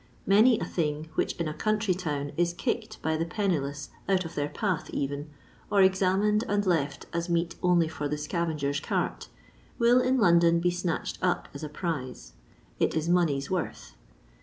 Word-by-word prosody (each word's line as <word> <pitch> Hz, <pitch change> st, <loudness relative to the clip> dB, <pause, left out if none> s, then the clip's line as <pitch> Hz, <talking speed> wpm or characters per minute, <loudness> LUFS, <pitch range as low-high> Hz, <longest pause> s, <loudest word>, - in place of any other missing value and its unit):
Many 220 Hz, +4 st, +5 dB
a -, -, -2 dB
thing 155 Hz, -2 st, -2 dB
which -, -, 0 dB
in 170 Hz, -, -2 dB
a 155 Hz, -, -3 dB
country 215 Hz, +3 st, 0 dB
town 145 Hz, -6 st, -3 dB
is 175 Hz, 0 st, +1 dB
kicked -, -, -3 dB
by 160 Hz, 0 st, +1 dB
the 165 Hz, -, 0 dB
penniless 160 Hz, -7 st, -2 dB, 0.2 s
out 185 Hz, -2 st, +2 dB
of 165 Hz, -, -7 dB
their 145 Hz, 0 st, -2 dB
path 190 Hz, -4 st, -2 dB
even, 145 Hz, +2 st, -3 dB, 0.4 s
or 200 Hz, -2 st, +5 dB
examined 190 Hz, +3 st, +3 dB
and 205 Hz, 0 st, +1 dB
left 145 Hz, -6 st, 0 dB
as 170 Hz, +1 st, -2 dB
meet 170 Hz, 0 st, 0 dB
only 175 Hz, -2 st, +3 dB
for 150 Hz, -2 st, -4 dB
the 150 Hz, +1 st, -2 dB
scavenger's 150 Hz, -2 st, -1 dB
cart, -, -, -2 dB, 0.5 s
will 245 Hz, +1 st, +5 dB
in 255 Hz, +1 st, +2 dB
London 170 Hz, -5 st, +5 dB
be 175 Hz, +1 st, +2 dB
snatched 175 Hz, -1 st, -3 dB
up 180 Hz, -1 st, 0 dB
as 140 Hz, -, -8 dB
a 150 Hz, -, -4 dB
prize; 145 Hz, -, -5 dB, 0.5 s
it -, -, +1 dB
is 160 Hz, 0 st, 0 dB
money's 165 Hz, -5 st, +1 dB
worth. 180 Hz, -3 st, -3 dB
170 Hz, 175 wpm, -28 LUFS, 150-190 Hz, 0.5 s, Many